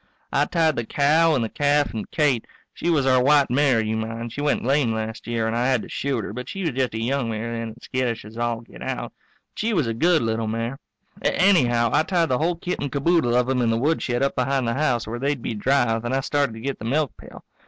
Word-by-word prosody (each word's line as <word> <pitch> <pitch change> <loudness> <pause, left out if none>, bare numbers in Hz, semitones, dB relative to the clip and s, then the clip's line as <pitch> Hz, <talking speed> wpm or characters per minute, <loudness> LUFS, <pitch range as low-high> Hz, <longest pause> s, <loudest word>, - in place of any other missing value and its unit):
I - - +3
tied 160 -3 +1
the 120 - 0
cow 155 +6 +3
and 125 - +1
the - - -1
calf 145 +2 +1
and 110 - -5
Kate 145 -7 +1 0.3
she 175 - -2
was 150 -5 +2
our 130 -1 +4
white 145 0 +4
mare; 135 -2 +3
you 110 0 -1
mind 115 +1 -4
she 145 - -4
went 145 0 +1
lame 135 -3 +2
last 110 +1 -5
year 115 -1 -1
and 115 +1 -1
I 120 +1 +1
had 130 -4 +1
to - - -10
shoot 135 -5 -2
her, - - -6
but 125 +2 -6
she 195 - -5
was 165 -4 0
just 130 -2 -1
a - - -2
young 125 +1 -1
mare 115 +1 -3
then 115 - -3
and 110 +2 -11
skittish 125 -4 -2
as 110 +1 -12
all 120 -1 -2
get 115 - -15
out - - -4 0.4
but - - -12
she 220 0 0
was 160 -7 +2
a 115 - -1
good 165 +6 +3
little 110 0 -1
mare. 115 +5 -3 0.4
Anyhow, 120 - +3
I - - +5
tied 170 -1 +1
the 125 - +1
whole 170 +3 +1
kit 175 +2 -4
and 145 -2 -3
caboodle 140 -3 +2
of 125 0 +3
them 130 0 0
in 115 - +2
the 115 - +1
woodshed 135 -2 0
up 140 - +1
behind 130 -1 0
the 115 - 0
house, 130 -4 0
where 115 +2 -5
they'd 140 -2 -1
be - - -2
dry, 120 0 +1
then 120 +2 -3
I 135 - +1
started 140 -2 0
to 110 - -9
get 135 +2 -3
the 110 - -7
milkpail. 140 +3 -3
125 Hz, 260 wpm, -23 LUFS, 115-145 Hz, 0.4 s, I